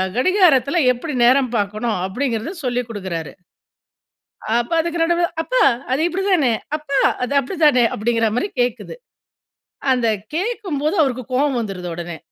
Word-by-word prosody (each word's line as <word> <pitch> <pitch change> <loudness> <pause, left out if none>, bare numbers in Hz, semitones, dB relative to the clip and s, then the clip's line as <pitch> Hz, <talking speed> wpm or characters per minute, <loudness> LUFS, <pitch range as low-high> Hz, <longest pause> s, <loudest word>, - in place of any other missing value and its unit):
கடிகாரத்துல 330 - +3
எப்டி 275 +5 -5
நேரம் 255 0 +4
பாக்கணும், 210 +1 -1
அப்படிங்றத 235 - -2
சொல்லிக் 245 -1 -1
குடுக்குறாரு. 185 -7 -5 1.3
அப்ப 240 +7 -3
அதுக்கு 340 0 -2
நடுவுல, 345 +1 +2 0.2
"அப்பா - - +1 0.3
அது 275 - +1
இப்டி 375 +3 -3
தானே? 285 -10 +3 0.2
அப்பா 280 -3 -2 0.2
அது 250 - -2
அப்டிதானே?" 290 -4 +3
அப்டிங்ற 230 +1 +1
மாரி 400 - 0
கேக்குது. 245 - -2 1.0
அந்த 245 -3 +2 0.3
கேக்கும்போது, 365 -5 -2
அவருக்கு 255 -3 0
கோவம் 270 -1 +1
வந்துருது 195 -5 -5
உடனே, 170 -1 -6
255 Hz, 125 wpm, -20 LUFS, 230-320 Hz, 1.3 s, நேரம்